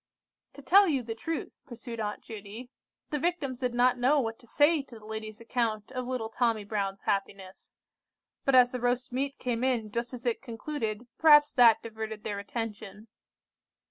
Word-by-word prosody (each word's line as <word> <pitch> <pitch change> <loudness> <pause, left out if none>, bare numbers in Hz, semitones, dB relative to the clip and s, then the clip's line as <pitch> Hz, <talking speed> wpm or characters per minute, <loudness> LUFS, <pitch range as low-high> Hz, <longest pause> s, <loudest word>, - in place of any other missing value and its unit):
"To 285 - -12
tell 395 +7 +6
you 275 -6 0
the 225 -1 -4
truth," 325 +7 -5
pursued 235 -2 -8
Aunt 210 -1 -4
Judy, 220 +3 -9 0.4
"the 295 - 0
Victims 285 -7 -2
did 250 -2 -1
not 250 0 +3
know 275 +4 +4
what 225 -3 -3
to 240 - -18
say 295 +5 +3
to 265 -4 -13
the 215 - -15
lady's 220 0 -6
account 230 -2 -2
of 255 -2 -4
little 250 -3 -2
Tommy 230 -2 0
Brown's 200 -2 -3
happiness; 195 -1 -4 0.7
but 275 - +3
as 250 -1 +7
the 250 - -3
roast 245 +1 0
meat 275 +2 -2
came 245 -1 -2
in 235 -5 0
just 235 +2 -3
as 250 -1 -9
it 240 -2 0
concluded, 230 -2 -4
perhaps 295 -2 +7
that 235 -3 +6
diverted 220 -1 -6
their 205 -1 -3
attention. 215 0 -6
235 Hz, 175 wpm, -29 LUFS, 220-260 Hz, 0.7 s, as